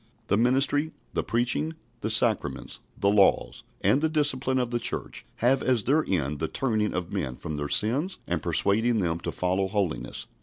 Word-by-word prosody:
The - - +3
ministry, 135 +6 +2 0.2
the - - -1
preaching, 125 +7 -1 0.2
the - - -3
sacraments, - - +1 0.2
the 100 - +3
laws, 100 -2 +2 0.2
and 140 - +3
the 160 - +2
discipline 140 -4 +1
of 125 -2 -1
the 120 - 0
Church - - -3
have 130 +3 +2
as 125 -5 +2
their 150 +7 +2
end 75 -5 -1
the 80 - -1
turning 110 -3 -1
of 90 0 -4
men 75 -11 -2
from 75 - -6
their 75 0 -4
sins 140 - +2
and 85 -1 -2
persuading 100 +8 +2
them 85 -4 -1
to - - -4
follow 95 +2 0
holiness. 90 - -2
110 Hz, 180 wpm, -26 LUFS, 90-130 Hz, 0.2 s, The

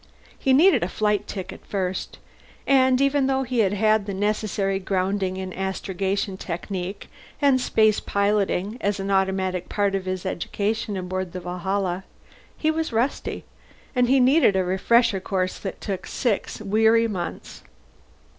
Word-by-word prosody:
He 265 - 0
needed 335 +9 +6
a 175 - 0
flight 210 0 0
ticket, 190 -2 -7
first, 190 -2 -3 0.5
and 260 -2 +4
even 275 0 +2
though 270 0 +1
he 250 -1 -2
had 200 -3 +3
had 215 0 +2
the 200 - -3
necessary 205 -1 0
grounding 190 0 -1
in 190 -1 -5
astrogation 190 +1 -2
technique 185 +2 -5 0.3
and 280 -3 +4
spacepiloting 210 -2 +1
as 205 0 0
an 195 +1 -2
automatic 190 -2 0
part 200 -1 0
of 195 -1 -2
his 185 -1 -3
education 205 +3 -2
aboard 185 -1 -4
the 185 - -4
Valhalla, 180 +1 -2 0.5
he 315 - +1
was 320 -1 -2
rusty, 235 +5 -1 0.5
and 250 -1 +3
needed 265 -3 +5
a 190 - +2
refresher 200 +4 +2
course 185 -1 -2
that 195 - -6
took 195 -3 -4
six 230 -6 -1
weary 220 +2 +3
months. 185 -5 -6
200 Hz, 140 wpm, -24 LUFS, 190-225 Hz, 0.5 s, needed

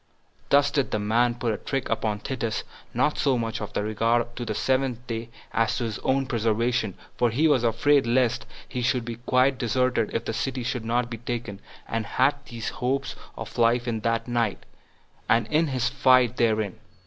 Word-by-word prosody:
Thus 140 0 +4
did 140 -2 +1
this 105 - -1
man 120 +3 +2
put 120 -2 -1
a - - -3
trick 135 -2 -3
upon 110 -2 -1
Titus, 115 -6 -2 0.3
not 150 - +1
so 135 -3 +2
much 115 0 -3
out 105 - -5
of 105 - 0
regard 115 +2 +1
to 120 - -4
the 110 - -3
seventh 130 0 0
day 115 -1 -4 0.2
as 115 - +1
to - - -2
his 110 -2 -3
own 135 +1 +1
preservation, 115 -2 0 0.2
for 120 - +3
he 140 +8 +2
was 130 -6 +3
afraid 120 +4 +3
lest 120 0 +1 0.2
he 125 - -4
should 125 -1 +1
be 115 -1 -5
quite 125 +2 +2
deserted 125 -1 +1
if 115 - -2
the - - -2
city 130 +1 -2
should 120 -2 -3 0.2
be 115 - -4
taken, 115 -4 -4 0.3
and 115 -2 -2
had 130 +6 +3
his 115 -2 -5
hopes 135 +2 -2 0.2
of - - -7
life 120 +1 +3
in 115 -2 -1
that 115 +2 -1
night, 120 -4 -1 0.6
and 115 +1 +4
in 155 +2 +3
his 130 -3 0
flight 125 -2 +4
therein. 110 -2 +1
120 Hz, 190 wpm, -26 LUFS, 115-130 Hz, 0.6 s, Thus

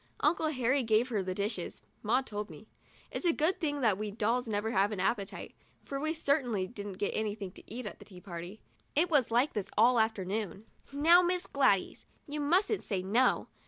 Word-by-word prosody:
Uncle 315 +1 +2
Harry 260 -2 +1
gave 225 +1 +2
her 210 -5 0
her 185 0 -3
dishes, 200 -2 -3 0.2
Maud 250 +5 +1
told 210 -3 -5
me. 165 +7 -12 0.4
It's - - -4
a 345 - +4
good 330 +4 0
thing 290 -3 -1
that 210 -5 +2
we 215 0 -2
dolls 230 +4 0
never 215 +1 -1
have 200 0 +2
any 205 - -4
appetite, 200 -1 -2 0.3
for 275 - -4
we 310 +2 -1
certainly 280 - 0
didn't 200 -2 -7
get 205 - -1
anything 210 -3 -3
to - - -14
eat 245 +2 -5
at 210 - -7
that - - -13
tea 185 -3 -12
party. 180 +2 -8 0.3
It 335 +4 +3
was 280 -6 +4
like 245 +5 +2
this 200 -2 -3
all 235 +2 +5
afternoon. 210 -2 -1 0.3
'Now, 325 +5 +6
Miss 360 0 0
Gladys, 200 -9 +1 0.2
you 295 +1 -5
mustn't 370 +8 +2
say 190 -4 -2
'no.' 235 +7 +2
225 Hz, 195 wpm, -31 LUFS, 205-285 Hz, 0.4 s, Now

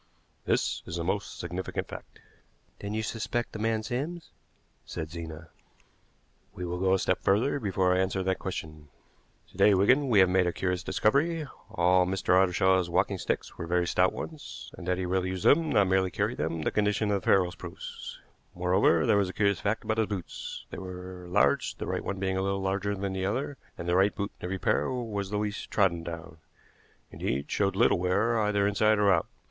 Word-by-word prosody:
This - - 0
is 85 - -4
a 85 - -2
most 100 +4 -2
significant 90 +2 -4
fact." - - -10 0.6
"Then 100 +1 -4
you 110 - -1
suspect 120 +2 -2
the 110 - -7
man 110 0 0
Sims," 145 +9 -4 0.5
said 80 -1 -6
Zena. 80 -1 -8 1.1
"We 90 - -4
will 90 +1 -3
go 95 0 +3
a - - +2
step - - 0
further 110 +9 +2
before 95 -4 +1
I 90 - +2
answer 95 0 0
that 95 0 0
question. 75 -5 -6 0.6
To - - -17
day, 105 - +6
Wigan, 130 +9 +4
we 110 - +4
have 95 -1 +7
made 90 0 +2
a - - +1
curious 90 -1 -1
discovery. 150 +10 +1 0.2
All 90 +1 +3
Mr. 95 0 -3
Ottershaw's 95 -1 +3
walking - - +1
sticks - - -3
were 85 - -4
very 90 +1 +2
stout 90 +1 +3
ones, 155 -3 -8
and 85 - -9
that 90 0 +1
he 95 - -2
really 95 +1 0
used 95 -1 -4
them, 160 +2 +5
not 100 -8 +4
merely 95 0 +2
carried - - -2
them, 80 +1 -2
the - - 0
condition 105 0 +1
of 100 -1 +1
the - - -17
ferrules 90 -2 +4
proves. - - -8 0.4
Moreover, 90 -2 +3
there 105 - +4
was 100 -2 +1
a - - -6
curious 100 -2 +2
fact 105 +2 -1
about 110 0 -1
his 110 - +2
boots. 100 -5 -6
They - - -6
were 90 -1 -8
large, 70 -5 +2
the - - -5
right - - -2
one 100 - -3
being 95 0 -1
a - - 0
little 100 0 0
larger 100 +1 -1
than 100 0 -3
the 95 0 -1
other, 135 +7 -2 0.2
and 85 - -6
the 85 - +2
right 95 +2 +3
boot 100 0 -3
in - - -6
every 95 +2 -2
pair - - +1
was 110 -6 -3
the 105 - -1
least 105 0 -3
trodden 90 -5 +2
down 85 -1 -8 0.7
indeed, 70 +3 -3
showed 100 -2 +1
little 95 - +4
wear 100 +6 +1
either 105 -1 +2
inside 105 +1 +3
or 100 -1 +4
out. 85 - +1
95 Hz, 205 wpm, -28 LUFS, 90-105 Hz, 1.1 s, have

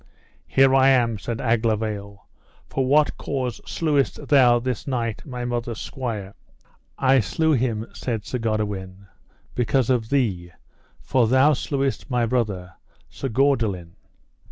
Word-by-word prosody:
Here 135 0 +4
I 135 0 +5
am, 120 -5 +2
said 115 +2 -4
Aglovale: 110 -4 -1 0.4
for 130 -1 -2
what 150 +2 +3
cause 130 -4 -3
slewest 150 -4 0
thou 130 -4 +6
this 125 0 -3
night 120 -4 -2
my 125 -2 -5
mother's 120 -2 -3
squire? 110 -7 -5 0.6
I 135 0 +4
slew 125 - +1
him, 115 -5 0
said 115 -5 -4
Sir 125 - -3
Goodewin, 100 -4 -3 0.5
because 125 +1 +1
of 115 -3 0
thee, 95 -11 -1 0.5
for 125 -3 +2
thou 130 +5 +5
slewest 140 +1 -2
my 120 -2 +1
brother, 105 -7 -2 0.4
Sir 135 - -4
Gawdelin. 110 -9 +1
120 Hz, 130 wpm, -23 LUFS, 110-130 Hz, 0.6 s, thou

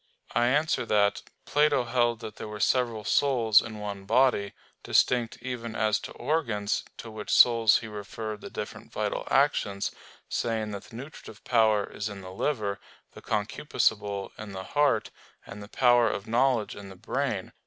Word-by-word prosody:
I 120 +1 +3
answer 150 +4 +2
that, 105 -1 +2 0.2
Plato 145 -2 +3
held 120 -1 +1
that 110 -2 -8
there - - -6
were 105 0 -7
several 115 -2 +1
souls 115 -4 +4
in 110 -2 -7
one 100 -2 -6
body, 115 -3 +2 0.3
distinct 120 -2 +2
even 115 -3 -5
as 110 -1 +2
to - - -8
organs, 120 -9 -1
to 115 - -8
which 110 -1 -8
souls 115 -3 +6
he 115 - -7
referred 105 0 -6
the - - -8
different - - -7
vital - - -3
actions, 100 -1 +1 0.4
saying 110 -2 -2
that 100 -1 -7
the 115 - -14
nutritive 125 -4 -10
power 110 -3 +3
is 105 +1 -5
in 100 -2 -8
the 95 0 -9
liver, 105 -3 -1 0.3
the - - -12
concupiscible 100 -2 -1
in 105 -2 -7
the 95 0 -6
heart, 145 -2 +1 0.3
and 100 +1 -9
the 100 - -9
power 120 +1 +4
of 100 - -4
knowledge 115 -2 +1
in 100 -1 -10
the 95 - -11
brain. 120 0 -3
110 Hz, 165 wpm, -27 LUFS, 105-125 Hz, 0.4 s, souls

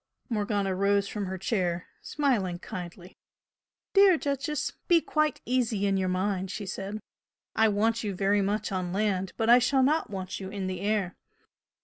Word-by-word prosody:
Morgana 205 -3 0
rose 200 +1 +2
from 205 -2 -4
her 190 +1 -4
chair, 180 -3 -1 0.2
smiling 230 -12 0
kindly. 180 0 -8 0.8
"Dear 390 -3 +7
'Duchess' 280 +1 -2
be 345 -1 +6
quite 305 -1 0
easy 230 -5 0
in 195 -1 +2
your 190 -1 0
mind!" 190 0 -1
she 205 +2 -5
said 195 +2 -5 0.6
"I 220 - +5
want 220 +2 +1
you 205 -3 -3
very 200 +2 +2
much 205 +2 -1
on 180 -2 -2
land, 195 -2 0
but 225 - 0
I 240 +1 +8
shall 260 +2 +3
not 305 +5 +2
want 190 -2 -5
you 190 -1 -6
in 195 -1 -4
the 185 -1 -3
air! 200 -3 0
200 Hz, 165 wpm, -28 LUFS, 190-230 Hz, 0.8 s, I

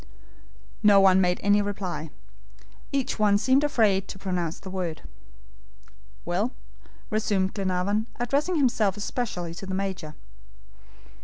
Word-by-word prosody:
No 205 -1 +7
one 190 -1 +6
made 180 -1 +1
any 205 +1 +4
reply. 190 -5 -4 0.8
Each 275 -4 -1
one 205 -1 +4
seemed 260 +6 +3
afraid 210 -9 +2
to - - -7
pronounce 180 -4 -3
the 190 - -9
word. 180 -4 -4 1.2
"Well?" 195 +8 -1 0.6
resumed 205 -3 0
Glenarvan, 200 +2 -1
addressing 280 +9 0
himself 235 - +2
especially 205 -6 -3
to 190 +3 -8
the 190 - -3
Major. 190 -6 -4
195 Hz, 120 wpm, -26 LUFS, 185-220 Hz, 1.2 s, No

